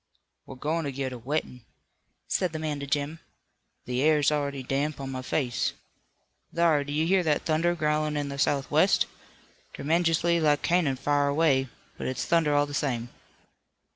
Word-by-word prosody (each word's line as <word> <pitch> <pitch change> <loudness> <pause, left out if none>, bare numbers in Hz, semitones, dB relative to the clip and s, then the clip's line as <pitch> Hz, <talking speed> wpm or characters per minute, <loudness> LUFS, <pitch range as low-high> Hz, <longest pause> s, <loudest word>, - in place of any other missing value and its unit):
"We're 135 - -8
going 155 +5 -2
to 140 - -2
get 130 -1 -3
a - - -6
wettin'," 130 0 -3 0.7
said 180 -3 0
the - - -2
man 155 -2 -3
to 140 - -5
Jim. 145 +3 -1 0.7
"The 125 +1 -1
air's 150 -1 +4
already 140 -2 -2
damp 140 +4 -1
on 135 -1 -5
my 130 -1 -4
face. 130 -2 -1 0.8
Thar, 165 -4 +3
do 145 - -7
you 155 +2 +1
hear 190 +2 +3
that 155 -4 +1
thunder 165 +2 +1
growlin' 150 -1 0
in 145 -1 -2
the 140 0 -6
southwest? 140 -1 +3 0.7
Tremenjously 165 +2 +2
like 150 -2 +2
cannon 170 -6 +2
far 145 +2 +1
away, 140 -3 +2 0.3
but - - -3
it's 130 - -2
thunder 160 -3 +2
all 145 0 +4
the 145 - -9
same." 120 -5 -1
145 Hz, 170 wpm, -27 LUFS, 140-155 Hz, 0.8 s, air's